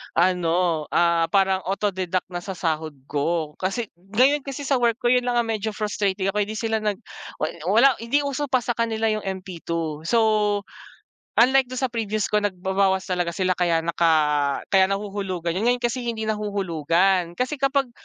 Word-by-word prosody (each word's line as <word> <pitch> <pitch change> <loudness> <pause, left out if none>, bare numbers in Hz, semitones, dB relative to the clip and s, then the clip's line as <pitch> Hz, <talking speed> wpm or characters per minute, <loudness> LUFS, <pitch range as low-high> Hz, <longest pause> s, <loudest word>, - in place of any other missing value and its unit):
ano, 170 -2 +1
ah, 170 -1 +2
parang 190 +1 +2
auto 200 +1 0
deduct 185 -1 -2
na 175 - -3
sa 190 +1 -6
sahod 160 -3 -2
ko, 150 +2 -1
kasi 195 +4 -2 0.2
ngayon 270 +5 +5
kasi 275 0 -7
sa 270 -2 +1
work 235 -2 +2
ko 240 0 0
'yon 250 0 +2
lang 245 - +1
yung 235 -1 +1
medyo 215 -1 -3
frustrating 200 -2 -1
ako 210 - -1
hindi 210 +1 -1
sila, 225 -1 -1
nag 210 -2 -1 0.4
wa 155 - -1 0.2
wala 240 +7 +4
hindi 280 +6 0
uso 280 +1 -2
pa 255 -2 +1
sa 240 - -1
kanila 225 -1 0
yung 215 -2 -3
MP2 170 -4 -4
So, 215 -2 +2 0.7
unlike 260 +2 +5
do'n 255 +1 -5
sa 260 - +1
previous 215 -3 -2
ko 210 - +3
nagbabawas 190 -1 0
talaga 175 -2 -1
sila, 185 -1 0
kaya 170 -2 +2
naka 150 -4 +2
kaya 190 -1 +5
nahuhulugan 195 -3 -3
'yon. 190 +7 -1
Ngayon 245 0 +2
kasi 240 0 -1
hindi 220 -2 -2
nahuhulugan. 185 -3 0
Kasi 255 +6 -2
kapag 275 -1 +1
200 Hz, 175 wpm, -23 LUFS, 175-230 Hz, 0.7 s, ngayon